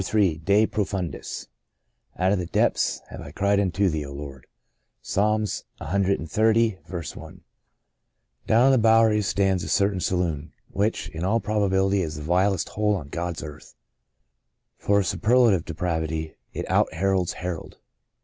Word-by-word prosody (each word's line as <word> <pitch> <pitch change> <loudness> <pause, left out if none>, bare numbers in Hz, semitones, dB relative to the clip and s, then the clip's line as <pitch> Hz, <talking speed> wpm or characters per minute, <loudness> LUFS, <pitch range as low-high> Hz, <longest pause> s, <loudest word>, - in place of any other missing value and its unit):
Ill 95 -2 +2
DE 100 +5 +4
PROFUNDIS 95 -7 -3 0.7
Out 95 +1 +2
of 100 - +1
the 90 - -3
depths - - +1
have - - -8
I - - -8
cried 100 +5 +1
unto 100 0 +1
thee, 80 -4 -1
O 70 - -8
Lord." 70 -2 -9 0.3
— - - -51
Fs. - - -6
cxxx, 105 +1 +1 0.2
I, 100 0 0 1.1
DOWN 115 +3 +5
on 135 - +6
the 130 - +4
Bowery 110 -1 +4
stands 95 -3 +1
a - - -5
cer 100 +1 +3
tain 95 - -4
saloon, 85 -4 -2 0.2
which, 105 +3 -1
in 80 +1 -6
all 110 +5 +2
probability, 100 -2 +1
is 80 -3 -3
the 75 - -7
vilest 90 +2 +1
hole 105 0 +1
on 75 -7 -6
God's 85 +2 -4
earth. 75 -1 -11 1.0
For 100 0 +2
superlative 110 -3 +3
depravity 80 -1 -3 0.2
it - - -5
out - - +2
Herods 95 -3 +1
Herod. 90 -3 -6
95 Hz, 150 wpm, -25 LUFS, 80-105 Hz, 1.1 s, on